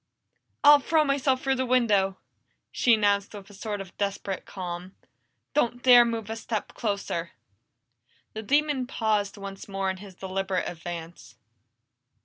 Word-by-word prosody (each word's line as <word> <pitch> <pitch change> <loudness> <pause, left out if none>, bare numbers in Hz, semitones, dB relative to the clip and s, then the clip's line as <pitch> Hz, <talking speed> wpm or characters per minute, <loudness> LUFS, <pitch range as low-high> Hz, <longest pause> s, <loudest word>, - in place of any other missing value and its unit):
"I'll 290 0 +9
throw 315 +3 +2
myself 275 -2 +1
through 270 - +2
the 260 - +1
window!" 210 -6 +2 0.5
she 235 -2 +4
announced 205 -1 +1
with 200 -1 -10
a - - -14
sort 205 +1 -5
of 190 -3 -11
desperate 200 -1 -3
calm. 180 0 -6 0.6
"Don't 245 -4 0
dare 245 -2 +8
move 225 -2 -3
a - - -3
step 225 -1 -4
closer!" 200 -6 -3 1.0
The 220 - -5
demon 285 +2 +1
paused 215 -5 -1
once 195 -1 -8
more 195 -1 -1
in 190 - -7
his 195 -1 -12
deliberate 190 0 -2
advance. 170 0 -8
205 Hz, 140 wpm, -26 LUFS, 195-245 Hz, 1.0 s, I'll